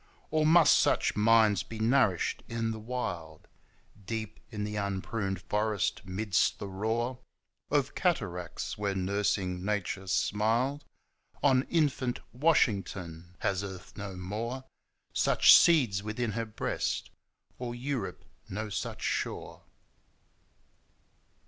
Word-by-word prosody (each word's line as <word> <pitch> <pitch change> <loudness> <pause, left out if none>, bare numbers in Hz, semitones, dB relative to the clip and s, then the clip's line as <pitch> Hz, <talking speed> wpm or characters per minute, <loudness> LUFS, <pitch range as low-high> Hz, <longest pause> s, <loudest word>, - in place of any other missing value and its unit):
Or 155 0 +3
must 165 0 +7
such - - +2
minds 110 -3 +4
be 115 - -8
nourished 110 -5 +2
in 115 -1 -1
the 110 - -5
wild, 90 -10 -5 0.6
Deep 110 +1 -5
in 105 -3 -4
the 105 0 -4
unpruned 100 -1 -2
forest, 105 -1 0
midst 95 +1 +1
the 100 - -6
roar 115 +6 -2 0.5
Of 140 -2 +1
cataracts, 100 - -2
where 100 -1 -1
nursing 95 -1 0
nature 100 -1 -2
smiled 115 +9 +1 0.6
On 130 -2 +4
infant 140 -6 +1
Washington? 95 - 0
Has 95 0 0
Earth 95 -2 -8
no 100 -2 -6
more 110 +8 -4 0.5
Such - - +7
seeds 125 - +5
within 110 +2 -2
her 115 +2 -2
breast, 110 - -2 0.5
or 120 -1 -4
Europe 120 -7 -4 0.2
no 105 +3 -4
such 100 - -4
shore? - - -3
105 Hz, 110 wpm, -30 LUFS, 95-120 Hz, 0.6 s, must